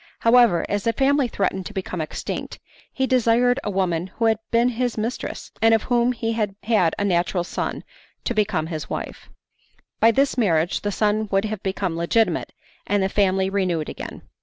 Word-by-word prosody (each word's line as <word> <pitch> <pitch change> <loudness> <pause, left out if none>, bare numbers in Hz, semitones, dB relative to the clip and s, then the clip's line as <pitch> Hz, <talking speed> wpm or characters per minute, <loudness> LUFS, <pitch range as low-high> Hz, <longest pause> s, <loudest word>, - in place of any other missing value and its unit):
However, 230 -6 +4
as 205 -1 -1
the 230 - +1
family 275 +2 +2
threatened 190 -4 -2
to 210 - -11
become 185 -2 -3
extinct, 155 - -5 0.3
he 265 - 0
desired 245 0 +3
a - - -2
woman 185 -3 0
who 230 - -3
had 220 -1 +3
been 235 +1 +3
his 245 -1 -2
mistress, 225 +3 -4
and 225 0 +6
of 220 - -1
whom 245 0 +2
he 230 -2 -2
had 210 -3 -2
had 210 -7 +2
a 205 - 0
natural 175 -1 +1
son, - - -4 0.4
to - - -1
become 210 -7 0
his 160 -2 -5
wife. - - -6 0.7
By 225 - +6
this 265 +2 +2
marriage 170 -6 +1
the 205 - -2
son 210 +1 +1
would 195 +1 +2
have 215 -2 -4
become 190 -3 -2
legitimate, 170 +7 +1 0.4
and 205 -1 +1
the 190 - +1
family 190 -1 +2
renewed 185 -5 -1
again. - - -8
210 Hz, 185 wpm, -23 LUFS, 190-230 Hz, 0.7 s, and